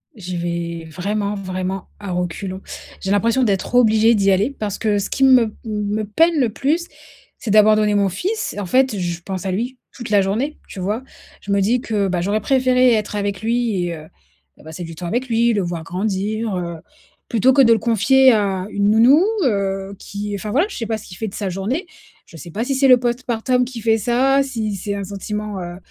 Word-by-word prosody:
J'y 185 Hz, -3 st, -6 dB
vais 170 Hz, -1 st, -4 dB
vraiment, 200 Hz, +4 st, -2 dB
vraiment 185 Hz, -1 st, -4 dB
à 200 Hz, -2 st, -6 dB
reculons. 180 Hz, +2 st, -3 dB, 0.4 s
J'ai 190 Hz, -, -3 dB
l'impression 230 Hz, +5 st, +2 dB
d'être 200 Hz, +2 st, 0 dB
obligée 225 Hz, -1 st, +5 dB
d'y 200 Hz, -3 st, +3 dB
aller 205 Hz, +9 st, +1 dB
parce 205 Hz, -2 st, -3 dB
que 210 Hz, -2 st, 0 dB
ce 200 Hz, -, -3 dB
qui 270 Hz, -, 0 dB
me 255 Hz, -3 st, +7 dB
m 215 Hz, -, -5 dB
me 210 Hz, -1 st, -2 dB
peine 325 Hz, +10 st, +2 dB
le 250 Hz, -4 st, +2 dB
plus, 305 Hz, +10 st, -1 dB, 0.5 s
c'est 215 Hz, -, -4 dB
d'abandonner 215 Hz, 0 st, +5 dB
mon 200 Hz, -1 st, +2 dB
fils. 415 Hz, -, -3 dB
En 200 Hz, -, -3 dB
fait, 255 Hz, +2 st, +2 dB
je 175 Hz, -1 st, -3 dB
pense 190 Hz, +1 st, -5 dB
à 190 Hz, -, -1 dB
lui 240 Hz, +7 st, -3 dB, 0.2 s
toute 240 Hz, -4 st, -7 dB
la 205 Hz, -2 st, +4 dB
journée, 225 Hz, +10 st, -1 dB
tu 185 Hz, -, -8 dB
vois? 210 Hz, +6 st, -2 dB, 0.4 s
Je 200 Hz, -, -5 dB
me 200 Hz, -, +2 dB
dis 235 Hz, +6 st, +2 dB
que, 210 Hz, -5 st, -1 dB
bah, 180 Hz, -, -1 dB
j'aurais 205 Hz, +4 st, 0 dB
préféré 255 Hz, 0 st, +3 dB
être 210 Hz, -1 st, -1 dB
avec 200 Hz, -1 st, -2 dB
lui 225 Hz, -5 st, 0 dB
et 170 Hz, -1 st, -3 dB
heu, 155 Hz, 0 st, -11 dB, 0.5 s
heu, -, -, -17 dB
passer 160 Hz, +3 st, -8 dB
du 165 Hz, -1 st, -8 dB
temps 175 Hz, -, -6 dB
avec 245 Hz, +7 st, -2 dB
lui, 235 Hz, +1 st, +3 dB
le 205 Hz, -, +1 dB
voir 175 Hz, -2 st, -4 dB
grandir, 200 Hz, +4 st, -2 dB
heu, 170 Hz, -1 st, -4 dB, 0.5 s
plutôt 240 Hz, +3 st, +3 dB
que 275 Hz, -, +5 dB
de 235 Hz, -3 st, +5 dB
le 225 Hz, -, +4 dB
confier 255 Hz, +4 st, +4 dB
à 195 Hz, -3 st, 0 dB
une 200 Hz, -1 st, +1 dB
nounou, 245 Hz, -, +6 dB, 0.2 s
heu, 195 Hz, -3 st, -1 dB
qui 205 Hz, +1 st, -5 dB
enfin 205 Hz, +1 st, -5 dB
voilà, 310 Hz, -, +2 dB
je -, -, -8 dB
sais 230 Hz, -, -3 dB
pas 220 Hz, 0 st, -2 dB
ce 215 Hz, -, -12 dB
qu'il 180 Hz, -, -10 dB
fait 220 Hz, -2 st, -3 dB
de -, -, -17 dB
sa 205 Hz, -, -3 dB
journée. 215 Hz, -, -3 dB, 0.4 s
Je -, -, -16 dB
sais 170 Hz, +1 st, -10 dB
pas 225 Hz, +6 st, -2 dB
si 275 Hz, -, -1 dB
c'est 270 Hz, +1 st, +3 dB
le 250 Hz, -1 st, +7 dB
post 240 Hz, +1 st, -2 dB
partum 250 Hz, +2 st, +1 dB
qui 245 Hz, -2 st, -7 dB
fait 225 Hz, 0 st, +3 dB
ça, 260 Hz, +5 st, +2 dB
si 225 Hz, -6 st, -3 dB
c'est 200 Hz, +2 st, -4 dB
un 200 Hz, -, -4 dB
sentiment, 205 Hz, +1 st, -5 dB
heu, 175 Hz, 0 st, -7 dB
210 Hz, 220 wpm, -20 LUFS, 195-240 Hz, 0.5 s, me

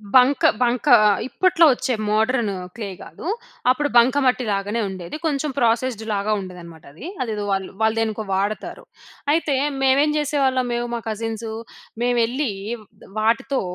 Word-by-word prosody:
బంక, 255 Hz, +2 st, +5 dB, 0.2 s
బంక 245 Hz, +3 st, +1 dB, 0.4 s
ఇప్పట్లో 340 Hz, +3 st, +3 dB
వచ్చే 255 Hz, 0 st, -1 dB, 0.2 s
మోడర్న్ 220 Hz, +1 st, +1 dB, 0.2 s
క్లే 215 Hz, -4 st, -5 dB
గాదు. -, -, -9 dB, 0.4 s
అప్పుడు 290 Hz, +3 st, +2 dB
బంకమట్టి 255 Hz, +1 st, +4 dB
లాగానే 205 Hz, +3 st, -1 dB
ఉండేది. 185 Hz, -, -7 dB
కొంచెం 300 Hz, -1 st, 0 dB
ప్రాసెస్డ్‌లాగా 225 Hz, -3 st, 0 dB
ఉండేదనమాట 175 Hz, -4 st, -10 dB
అది. 175 Hz, -, -11 dB, 0.2 s
అదేదో 220 Hz, -4 st, -2 dB
వాళ్ళు, 195 Hz, -1 st, -1 dB
వాళ్ళు 220 Hz, 0 st, +3 dB
దేనికో 220 Hz, -1 st, -1 dB
వాడతారు. 200 Hz, +3 st, -3 dB, 0.5 s
అయితే 310 Hz, -3 st, +1 dB, 0.3 s
మేమేం 270 Hz, +3 st, +4 dB
జేసేవాళ్ళం, 270 Hz, -4 st, +1 dB
మేము 240 Hz, 0 st, -2 dB
మా -, -, -2 dB
కజిన్సు, 225 Hz, 0 st, -4 dB, 0.5 s
మేము 245 Hz, 0 st, +2 dB
ఎళ్ళి 255 Hz, +1 st, -2 dB, 0.7 s
వాటితో 230 Hz, +5 st, +1 dB
235 Hz, 125 wpm, -22 LUFS, 215-265 Hz, 0.7 s, బంక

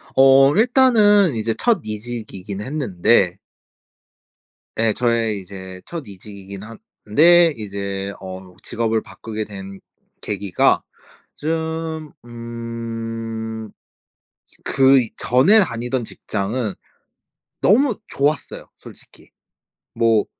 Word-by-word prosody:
어 135 Hz, +2 st, +6 dB
일단은 215 Hz, -, +4 dB
이제 110 Hz, 0 st, -1 dB
첫 230 Hz, -7 st, +2 dB
이직이긴 105 Hz, -3 st, -6 dB
했는데 105 Hz, -, +1 dB, 1.4 s
예, 115 Hz, 0 st, +3 dB
저의 115 Hz, -3 st, 0 dB
이제 95 Hz, -1 st, -10 dB
첫 170 Hz, -4 st, -6 dB
이직이긴 100 Hz, 0 st, -10 dB
한데 150 Hz, +9 st, +3 dB
이제 100 Hz, -2 st, -5 dB
어 95 Hz, -1 st, -9 dB
직업을 115 Hz, -1 st, -1 dB
바꾸게 110 Hz, -1 st, -7 dB
된 95 Hz, -1 st, -9 dB, 0.4 s
계기가 100 Hz, -3 st, +1 dB, 0.5 s
좀 160 Hz, 0 st, -3 dB
음 115 Hz, -1 st, -6 dB, 0.9 s
그전에 135 Hz, -, +4 dB
다니던 125 Hz, -4 st, -2 dB
직장은 105 Hz, +1 st, -3 dB, 0.9 s
너무 240 Hz, +3 st, +3 dB
좋았어요, 145 Hz, +1 st, -2 dB
솔직히. -, -, -16 dB, 0.7 s
뭐 115 Hz, -2 st, +3 dB
115 Hz, 175 characters per minute, -20 LUFS, 105-140 Hz, 1.4 s, 어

